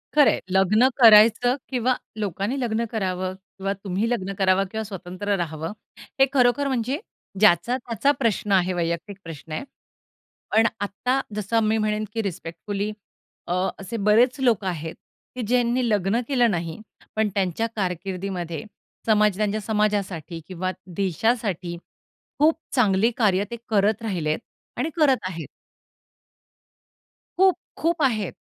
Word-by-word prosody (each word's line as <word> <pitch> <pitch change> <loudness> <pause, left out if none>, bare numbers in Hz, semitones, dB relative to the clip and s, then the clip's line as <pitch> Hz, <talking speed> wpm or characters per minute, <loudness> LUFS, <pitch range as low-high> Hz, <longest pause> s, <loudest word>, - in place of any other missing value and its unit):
खरं 295 -2 +7
आहे. - - -1
लग्न 195 +6 +4
करायचं 230 +1 +7
किंवा 255 -1 +1 0.2
लोकांनी 205 - -2
लग्न 235 -2 0
करावं 185 -3 -2 0.2
किंवा 195 +1 -1
तुम्ही 195 +4 -1
लग्न 195 -5 -2
करावं 195 0 +3
किंवा 220 0 -3
स्वतंत्र 195 0 -3
राहावं? 160 -1 -3 0.5
हे 270 - +8
खरोखर 260 +2 +3
म्हणजे 260 +2 -1 0.4
ज्याचा-त्याचा 230 +7 +3
प्रश्न 215 -4 0
आहे 185 -1 +3
वैयक्तिक 170 +3 -2
प्रश्न 160 -1 -10
आहे. 155 - -3 0.9
पण 225 +1 +5
आत्ता 250 +6 0 0.2
जसं 210 +2 0
मी 215 +1 +2
म्हणेन 215 0 0
की 225 - 0
रिस्पेक्टफुली 200 +3 -4 0.6
अ, - - -1 0.3
असे 210 +4 -5
बरेच 225 +6 +3
लोक 240 -6 +2
आहेत 165 -3 -3 0.4
की 250 - -3
ज्यांनी 245 +1 +2
लग्न 205 +1 +1
केलं 245 -5 +3
नाही. 170 +1 -3 0.3
पण 220 0 +2
त्यांच्या 195 +3 0
कारकिर्दीमध्ये, 180 -3 -3 0.4
समजा 210 -3 +3
त्यांच्या 215 0 0
समाजासाठी 200 -6 -1
किंवा 185 0 -3 0.2
देशासाठी 195 -2 0 0.6
खूप 310 +2 +5 0.2
चांगली 220 -2 +3
कार्य 200 -4 +3
ते - - -3
करत 215 +1 +2
राहिलेत 170 -8 -1 0.4
आणि 260 +6 0
करत 285 -5 +5
आहेत. 165 -5 -6 1.9
खूप 380 0 +5 0.2
खूप 335 0 0
आहेत. 215 -8 +1
210 Hz, 130 wpm, -24 LUFS, 185-235 Hz, 1.9 s, हे